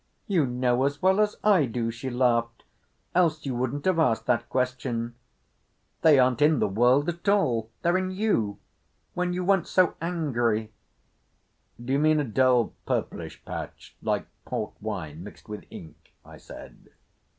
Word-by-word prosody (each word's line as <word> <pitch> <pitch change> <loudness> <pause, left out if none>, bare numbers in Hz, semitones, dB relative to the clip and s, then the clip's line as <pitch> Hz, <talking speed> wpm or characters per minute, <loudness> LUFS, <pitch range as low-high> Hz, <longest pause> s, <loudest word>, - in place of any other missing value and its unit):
"You 175 - +1
know 125 +1 +1
as 140 +1 -1
well 190 +4 +3
as 210 -1 +2
I 190 -10 +4
do," 115 0 -2
she 120 +3 -6
laughed, 120 -2 0 0.5
"else 165 -4 +2
you 135 - -2
wouldn't 130 +3 -2
have 185 -3 +2
asked 125 -8 +2
that 120 -1 0
question. 125 -2 -2 0.9
They 155 -3 +6
aren't 125 -1 +3
in 150 +1 +5
the - - +1
world 125 +8 +3
at 175 +3 -2
all. 120 - +2
They're 175 +2 +3
in 185 0 -2
you—when 180 - -3
you 180 0 -2
went 195 -1 +2
so 185 -3 +3
angry." 120 -11 -1 1.1
"D'you 130 +4 -1
mean 155 0 +3
a - - +1
dull 125 0 +2
purplish - - -3
patch, - - -8
like - - -1 0.2
port - - -4
wine 90 -7 -5
mixed 105 - -13
with 105 -2 -8
ink?" 80 -1 -13
I - - -13
said. - - -13
130 Hz, 150 wpm, -26 LUFS, 115-170 Hz, 1.1 s, They